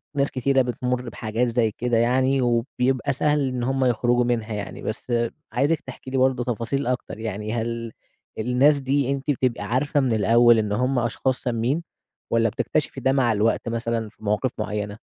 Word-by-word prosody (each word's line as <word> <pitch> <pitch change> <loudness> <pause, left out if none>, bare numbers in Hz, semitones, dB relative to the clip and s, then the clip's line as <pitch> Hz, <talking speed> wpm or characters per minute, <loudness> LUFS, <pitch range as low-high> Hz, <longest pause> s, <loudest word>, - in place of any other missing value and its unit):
ناس 140 0 +1
كتيرة 135 +1 +2
بتمُر 125 0 -2
بحاجات 115 +3 -1
زي 115 -2 +1
كده 120 -1 +1
يعني، 130 +3 +2
وبيبقى 125 +3 0
سهل 145 0 +1
إن 125 -1 -3
هُم 135 +1 +1
يخرجوا 120 0 +2
منها 115 -2 -1
يعني. 105 -1 -5
بس 120 +2 -4 0.4
عايزِك 145 +6 +1
تحكي 130 0 -10
لي 135 - 0
برضه 130 -1 +2
تفاصيل 125 +3 -2
أكتر 125 -3 -3
يعني، 110 0 -4
هل 115 0 -3 0.5
الناس 130 +6 +3
دي 135 0 0
أنتِ 140 +1 -1
بتبقى 125 -5 -1
عارفة 135 +6 0
من 130 -4 +1
الأول 115 +2 +5
إن 105 -1 -1
هُم 125 +4 +1
أشخاص 120 +2 -1
سامين، 125 +7 -1 0.5
والّا 115 -1 +3
بتكتشفي 140 +5 -2
ده 130 - +3
مع 125 -4 +3
الوقت 110 +2 +1
مثلًا 115 -1 -2
في 110 - -22
مواقف 105 +5 0
معينة؟ 105 -1 -3
125 Hz, 170 wpm, -24 LUFS, 115-130 Hz, 0.5 s, الأول